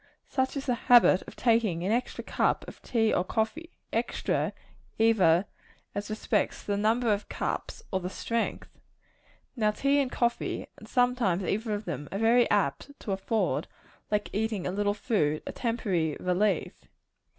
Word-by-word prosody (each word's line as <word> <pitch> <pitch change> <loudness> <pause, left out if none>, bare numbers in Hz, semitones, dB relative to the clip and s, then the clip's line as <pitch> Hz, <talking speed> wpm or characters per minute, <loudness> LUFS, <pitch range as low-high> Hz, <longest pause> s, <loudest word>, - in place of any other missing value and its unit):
Such 260 +1 -1
is 275 - -4
the 250 - +1 0.2
habit 240 -6 +7
of - - -10
taking 225 -8 +2
an 195 - 0
extra 245 +2 -1
cup - - 0
of - - -11
tea 225 -2 +1
or 175 - +2
coffee 225 - -2 0.2
extra, - - 0 0.5
either 195 -6 +4 0.5
as 205 +1 -4
respects 215 -1 -1
the 205 - -1
number 220 +2 +2
of 205 0 -4
cups - - -4
or 190 - +1
the 180 0 -4
strength. 230 +4 -3 0.8
Now 215 -4 +2
tea 275 +6 +2
and 265 -3 0
coffee 240 0 -1
and - - -13
sometimes 245 -8 +2
either 215 +4 -1
of 205 +1 -6
them 150 -4 -5
are 195 - -2
very 230 +3 +4
apt 205 - 0
to 210 - -4
afford, 195 +3 0 0.4
like 210 0 -1
eating 215 -2 -1
a - - -1
little 205 +1 0
food, 155 - 0
a - - -4
temporary 195 - -1
relief. 180 0 +1
215 Hz, 160 wpm, -28 LUFS, 190-235 Hz, 0.8 s, habit